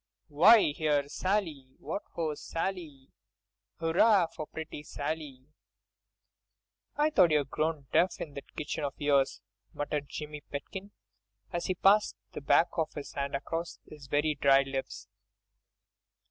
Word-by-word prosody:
"Why, 200 +5 +6
here's 145 -2 0
Sally! 160 -10 -2
What 165 +7 -4
ho, 160 -3 -1
Sally! 165 -4 -5 0.7
Hurrah 175 +4 +4
for 155 - -5
pretty 160 -2 -7
Sally!" 145 -3 -5 1.5
"I 300 +1 +2
thought 180 - +5
you'd 150 -2 +1
grown 155 -2 -1
deaf 180 +1 +3
in 150 - -6
that 140 - -10
kitchen 150 0 -4
of 140 -2 -3
yours," 140 -5 +2 0.3
muttered 145 -1 -3
Jimmy 150 -1 -6
Pitkin, 190 +8 -7 0.6
as 175 - -2
he 185 - 0
passed 200 +4 +4 0.2
the - - -7
back 165 +5 +4
of 160 -1 0
his 145 -2 -7
hand 140 0 -2
across 165 +4 -4
his 150 -2 -12
very 150 +2 +1
dry 140 -1 +4
lips. 135 -7 -5
150 Hz, 130 wpm, -30 LUFS, 140-170 Hz, 1.5 s, Why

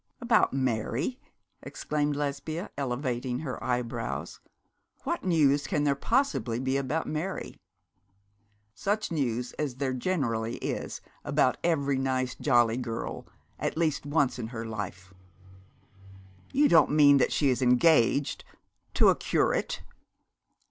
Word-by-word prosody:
'About 235 -3 +3
Mary!' 130 - -1 0.4
exclaimed 150 -1 -2
Lesbia, 145 +5 -3
elevating 125 -2 -2
her 135 -5 -5
eyebrows. 125 -2 -3 0.6
'What - - -2
news 145 -5 +3
can 145 - 0
there 145 -1 +3
possibly 225 - 0
be 130 +1 -1
about 140 +4 -1
Mary?' 165 +5 -4 1.1
'Such 205 - -2
news 125 -6 -1
as 145 -5 -2
there 130 0 -1
generally 120 -6 -1
is - - -4 0.2
about 145 -3 +2
every 140 -5 +1
nice 130 -1 -1
jolly 120 -1 +2
girl, 115 -3 -5 0.3
at - - -2
least 160 -3 0
once 145 -4 +1
in 115 - -3
her 115 -1 -6
life.' 95 -4 -6 1.4
'You 290 +2 +4
don't 160 - +5
mean 145 -1 +6
that 135 - +2
she 145 - +2
is 125 - -1
engaged 130 +1 +3 0.5
to - - +6
a - - +4
curate?' - - 0
135 Hz, 120 wpm, -28 LUFS, 125-155 Hz, 1.4 s, mean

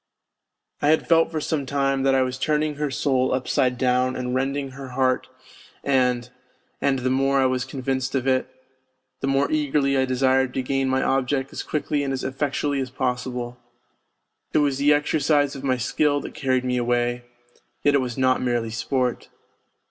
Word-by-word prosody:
I 145 - +2
had 155 +1 +3
felt 165 -1 +4
for 160 -1 -3
some 150 -2 -2
time 135 0 0
that 135 0 +3
I 130 - +4
was 130 0 -4
turning 150 0 0
her 150 -1 -1
soul 130 -1 +1
upside 125 -1 0
down 125 0 +1
and 125 -1 -3
rending 135 +1 -1
her 135 0 -8
heart, 130 -1 +1 0.6
and 125 -3 +1 0.5
and 140 -1 +2
the 130 0 -1
more 135 +1 +2
I 135 - +3
was 130 -1 0
convinced 130 0 -3
of 130 -1 0
it, 130 -1 +1 0.7
the 135 - -2
more 135 +1 +1
eagerly 145 -2 +1
I 130 - +3
desired 130 0 +1
to 130 - -1
gain 135 0 0
my 130 0 +1
object 135 0 0
as - - -4
quickly 150 -1 -1
and 135 -1 -2
as 130 - -3
effectually 140 +1 -1
as 130 - -4
possible. 125 -1 -3 0.9
It - - +3
was 140 -1 -1
the 145 +1 +4
exercise 145 -1 +2
of 135 - -8
my 130 -2 +1
skill 145 +4 +1
that - - -8
carried 130 -2 0
me 125 0 0
away; 120 0 0 0.6
yet 145 - +4
it 140 - +3
was 125 -2 -4
not 130 -1 +2
merely 120 -2 -1
sport. 125 +2 -1
130 Hz, 180 wpm, -23 LUFS, 130-140 Hz, 0.9 s, felt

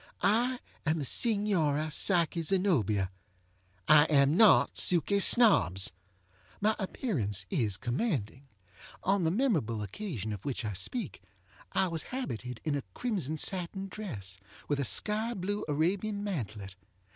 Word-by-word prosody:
I 240 +5 +2 0.3
am 155 +1 0
the 145 - -3
Signora 165 - +2
Psyche 170 +1 +2
Zenobia. 145 - +1 0.8
I 150 0 +7
am 145 -1 +3
not 215 +1 +5
Suky 180 +3 +2
Snobbs. 95 - +5 0.7
My 215 +1 +2
appearance 120 - -2
is 105 -5 +1
commanding. 130 - -3 0.6
On 195 -2 +1
the - - +3
memorable 165 - 0
occasion 110 - -5
of 100 - -8
which 130 -4 -4
I 105 - -3
speak 160 - -5 0.5
I 190 - +2
was 165 -2 -3
habited 125 - -5
in 155 - -1
a 140 - -1
crimson 185 - -2
satin 190 +3 -2
dress, 100 - -7 0.3
with 145 -1 -1
a 140 - 0
sky 220 - 0
blue 200 +3 -3
Arabian 190 +7 -1
mantelet. 110 - -5
160 Hz, 130 wpm, -30 LUFS, -, 0.8 s, I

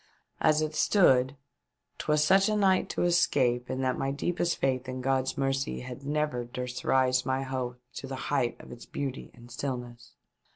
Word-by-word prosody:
As 155 0 +3
it 155 0 -3
stood, 135 -8 +3 0.6
'twas 150 0 +2
such 195 +5 +4
a 215 - +1
night 195 -3 +3
to - - -1
escape 130 -8 +2
in 130 - -2
that 130 -1 0
my 135 - 0
deepest 170 +5 -1
faith 130 -1 -1
in 130 0 -4
God's 130 0 0
mercy 135 0 -1
had 125 +1 -8
never 150 -3 -1
durst 125 +1 -6
raise 130 -1 +3
my 130 0 -1
hopes 130 -2 -4 0.2
to 135 - -8
the 135 - -5 0.2
height 120 -4 0
of - - -12
its 120 - -11
beauty 135 -2 -5
and 120 0 -15
stillness. 120 -2 -6
130 Hz, 175 wpm, -29 LUFS, 125-150 Hz, 0.6 s, such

